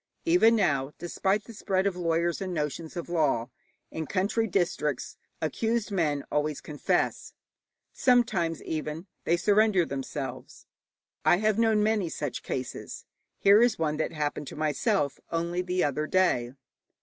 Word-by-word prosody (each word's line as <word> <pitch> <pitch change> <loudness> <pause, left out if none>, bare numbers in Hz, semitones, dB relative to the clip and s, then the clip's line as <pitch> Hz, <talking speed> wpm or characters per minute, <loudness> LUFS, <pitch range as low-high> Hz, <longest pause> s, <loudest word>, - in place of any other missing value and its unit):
Even 330 -10 +5
now, 145 -9 +1
despite 190 +4 0
the 230 - -11
spread 195 -2 0
of 200 -2 +1
lawyers 170 +1 0
and 190 -1 -3
notions 155 +3 -3
of 170 - -4
law, 145 -8 +1 0.4
in 160 -2 -4
country 210 +4 0
districts 170 - -1 0.3
accused 225 - -1
men 150 -7 0
always 150 -1 0
confess, 150 -1 -1 0.6
sometimes 215 - +2
even 155 +2 -4 0.2
they 170 - +3
surrender 205 -2 +3
themselves. 135 0 -6 0.6
I 175 - +5
have 215 +2 +1
known 220 -2 +3
many 210 -5 +1
such 145 -4 -4
cases. 130 -1 -5 0.3
Here 200 +2 +6
is 240 0 +3
one 155 -2 0
that 155 - -1
happened 150 -1 -3
to - - -7
myself 150 -1 0
only 170 +2 -1
the 180 0 0
other 150 +2 0
day. 155 -11 +2
170 Hz, 140 wpm, -28 LUFS, 150-200 Hz, 0.6 s, Here